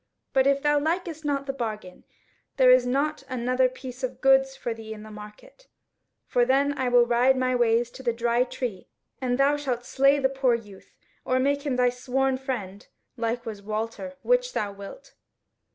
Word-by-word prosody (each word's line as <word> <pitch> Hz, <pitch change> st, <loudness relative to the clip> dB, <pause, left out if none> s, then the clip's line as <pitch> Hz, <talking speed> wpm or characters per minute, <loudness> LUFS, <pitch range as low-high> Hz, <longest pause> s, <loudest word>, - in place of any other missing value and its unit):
But 265 Hz, 0 st, +4 dB
if 275 Hz, 0 st, +2 dB
thou 295 Hz, 0 st, +3 dB
likest 325 Hz, +1 st, -2 dB
not 280 Hz, -2 st, -1 dB
the 270 Hz, -, -3 dB
bargain, 215 Hz, -7 st, -6 dB, 0.5 s
there 255 Hz, -2 st, +6 dB
is 255 Hz, -1 st, +5 dB
not 290 Hz, +4 st, 0 dB
another 255 Hz, +1 st, +1 dB
piece 255 Hz, 0 st, -9 dB
of 255 Hz, -1 st, -4 dB
goods 270 Hz, 0 st, +4 dB
for 235 Hz, -, -4 dB
thee 220 Hz, -1 st, -8 dB
in 210 Hz, -, -11 dB
the 215 Hz, -, -11 dB
market, 210 Hz, -, -13 dB, 0.6 s
for 245 Hz, -, +2 dB
then 275 Hz, +3 st, +2 dB
I 260 Hz, -2 st, -1 dB
will 245 Hz, -1 st, +5 dB
ride 245 Hz, +2 st, +3 dB
my 255 Hz, 0 st, +1 dB
ways 240 Hz, 0 st, +2 dB
to -, -, -11 dB
the 245 Hz, -2 st, 0 dB
Dry 235 Hz, +1 st, +1 dB
Tree, 245 Hz, -6 st, -5 dB, 0.3 s
and 245 Hz, -1 st, 0 dB
thou 280 Hz, +2 st, +3 dB
shalt 250 Hz, -4 st, -3 dB
slay 275 Hz, +1 st, +3 dB
the 270 Hz, -2 st, +2 dB
poor 265 Hz, -2 st, +1 dB
youth, 205 Hz, -4 st, -11 dB, 0.3 s
or 255 Hz, -, 0 dB
make 280 Hz, +2 st, +1 dB
of -, -, -15 dB
him 265 Hz, -, 0 dB
thy 250 Hz, 0 st, +3 dB
sworn 260 Hz, +1 st, -1 dB
friend, 205 Hz, -7 st, -5 dB, 0.3 s
like 235 Hz, 0 st, -2 dB
as -, -, -28 dB
was 215 Hz, -3 st, -6 dB
Walter 225 Hz, +6 st, -4 dB
which -, -, +2 dB
thou 205 Hz, -1 st, -2 dB
wilt." 200 Hz, -, -11 dB
255 Hz, 195 wpm, -26 LUFS, 235-275 Hz, 0.6 s, there